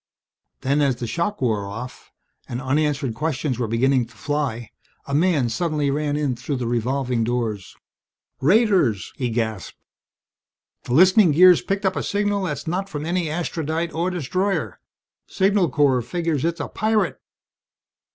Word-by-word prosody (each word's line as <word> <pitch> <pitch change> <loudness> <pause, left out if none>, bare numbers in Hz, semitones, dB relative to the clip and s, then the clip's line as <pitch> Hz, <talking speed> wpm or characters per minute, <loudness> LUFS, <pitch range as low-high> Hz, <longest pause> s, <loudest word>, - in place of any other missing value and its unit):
Then, 140 +3 +1
as 135 -3 +2
the 120 0 -5
shock 170 - -2
wore 105 -5 0
off 115 +5 -8 0.4
and 120 - -3
unanswered 140 -1 0
questions 145 -1 -2
were 120 - -1
beginning 125 +2 +2
to 120 - -20
fly, 120 -2 -3 0.3
a 140 - -6
man 155 -4 +2
suddenly 150 +3 -1
ran 145 0 -1
in 145 -4 0
through 130 +4 -4
the 125 -2 -3
revolving 120 +1 0
doors. 110 -5 -3 0.7
"Raiders!" 180 - +2
he 125 -3 -1
gasped. 110 -4 -3 1.1
"The 120 - -3
listening 185 +1 +6
gear's 180 +2 +7
picked 195 +1 -2
up 190 0 +1
a - - -1
signal 205 -1 0
that's 150 -5 -4
not 185 +4 -2
from 150 0 -5
any 170 -1 -1
Astrodite 165 0 -2
or 170 +3 0
destroyer. 185 +4 -2 0.5
Signal 195 -2 +2
Corps 140 -4 +2
figures 165 +1 -2
it's 170 +1 -1
a - - -3
pirate!" 220 0 0
145 Hz, 150 wpm, -22 LUFS, 125-175 Hz, 1.1 s, gear's